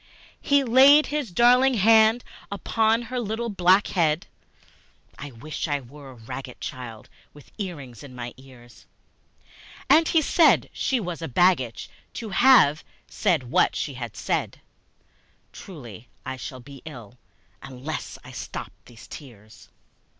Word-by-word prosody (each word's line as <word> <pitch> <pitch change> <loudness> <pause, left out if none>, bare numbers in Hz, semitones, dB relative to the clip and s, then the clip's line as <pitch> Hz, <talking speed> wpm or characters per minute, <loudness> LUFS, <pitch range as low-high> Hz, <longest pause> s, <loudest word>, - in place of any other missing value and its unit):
He 285 -1 +3
laid 270 +5 +6
his 295 -5 -3
darling 250 +7 +4
hand 220 +2 +4 0.3
upon 225 +3 0
her 250 +2 -4
little 230 +1 -3
black 190 0 +3
head, 160 -3 0 0.9
(I 145 - -7
wish 140 +7 -6
I 145 -1 -1
were 140 +2 -13
a - - -11
ragged 125 +3 -9
child 115 -4 -8 0.3
with 145 - -17
earrings 145 - -7
in 130 -3 -12
my 120 -1 -7
ears!) 125 -2 -17 1.0
And 325 0 +6
he 325 - +3
said 330 +2 +3
she 265 -2 -1
was 175 -5 -5
a 165 - -4
baggage 130 -5 +1 0.3
to 225 - -6
have 215 - +5 0.2
said 155 - -1
what - - +2
she 145 - -3
had 120 -5 -7
said; - - -2 0.9
(Truly 120 - -11 0.2
I 130 - -4
shall 130 0 -8
be 140 +1 -13
ill 125 -6 -11 0.4
unless 135 +4 -7
I - - -12
stop - - -7
these 115 -1 -15
tears!) 110 -7 -14
155 Hz, 135 wpm, -24 LUFS, -, 1.0 s, laid